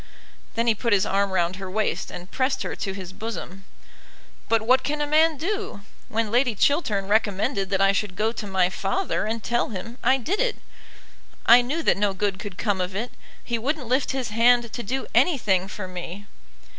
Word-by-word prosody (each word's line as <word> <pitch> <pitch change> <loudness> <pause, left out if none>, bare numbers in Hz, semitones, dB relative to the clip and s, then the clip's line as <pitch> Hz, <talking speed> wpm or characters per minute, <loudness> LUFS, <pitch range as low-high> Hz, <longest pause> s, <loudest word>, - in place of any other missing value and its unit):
Then 230 0 +1
he 230 - +4
put 230 +1 0
his 195 -2 +3
arm 200 +1 +1
round 185 -1 0
her 190 -1 -6
waist 215 +3 -1
and 180 +1 -9
pressed 265 +1 0
her - - -4
to 195 - -4
his 190 -2 -8
bosom. 195 -3 -7 0.8
"But 225 -1 +3
what 255 +3 +4
can 300 +1 -2
a 295 - +1
man 310 +1 +3
do? 390 - -3 0.3
When 220 -1 -1
Lady 245 -1 +2
Chiltern 210 - +1
recommended 200 -2 +1
that 195 -1 +1
I 195 0 +5
should 200 -2 -2
go 220 +3 +1
to 220 -2 -6
my 185 -2 +2
father 215 - -1
and 225 0 -3
tell 240 0 0
him, 230 +4 -7
I 265 - +4
did 330 - -2
it. - - +1 0.9
I 240 +1 +8
knew 295 +7 -2
that - - +3
no 200 -1 +1
good 195 0 -1
could 200 -4 -7
come 205 -4 0
of 180 +1 -3
it. 230 +5 -3 0.3
He 235 -1 -2
wouldn't 280 +3 -2
lift 255 +4 +1
his 260 -3 -2
hand 235 +1 +3
to 240 - -3
do 260 +5 -3
anything 225 - +3
for 195 -1 -6
me." 180 +2 -7
220 Hz, 200 wpm, -24 LUFS, 195-255 Hz, 0.9 s, I